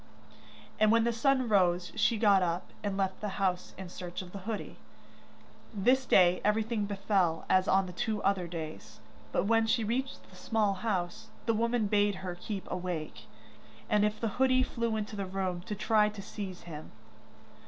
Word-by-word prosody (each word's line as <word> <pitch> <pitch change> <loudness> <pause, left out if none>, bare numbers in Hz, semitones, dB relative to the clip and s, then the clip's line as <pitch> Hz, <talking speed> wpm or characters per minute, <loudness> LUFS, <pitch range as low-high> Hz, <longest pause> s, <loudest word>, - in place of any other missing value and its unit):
And 215 0 +5
when 230 0 +4
the 235 0 +1
sun 260 +2 +2
rose 180 -4 +2
she 220 +1 +2
got 205 -3 +5
up, 175 0 -2
and 200 -2 -2
left 190 -1 -1
the 210 -2 -4
house, 185 -3 -1
in 190 -1 -7
search 175 +1 -6
of 180 - -12
the 200 - -7
hoodie. 220 - -4 1.0
This 250 +6 +2
day 180 -1 +5
everything 215 0 +1
befell 195 -4 0
as 185 +1 +3
on 190 0 +3
the 180 - -8
two 215 +4 -1
other 195 -3 +1
days, 160 -2 -7 0.3
but - - +1
when 225 +1 +3
she 225 0 +2
reached 255 +5 -3
the 185 - -17
small 210 +2 +1
house, 185 0 -3 0.2
the 230 - +2
woman 230 0 +1
bade 205 0 +2
her 180 - -3
keep 190 +2 -6
awake, 160 -12 -4 0.7
and 210 -1 +4
if 210 0 0
the 225 - 0
hoodie 255 -1 +4
flew 235 -3 -2
into 215 0 -4
the 200 -2 -3
room, 185 -2 -2
to 210 - -3
try 210 +1 +3
to 210 -1 -8
seize 195 -3 -6
him. 155 -3 -9
200 Hz, 180 wpm, -30 LUFS, 185-220 Hz, 1.0 s, And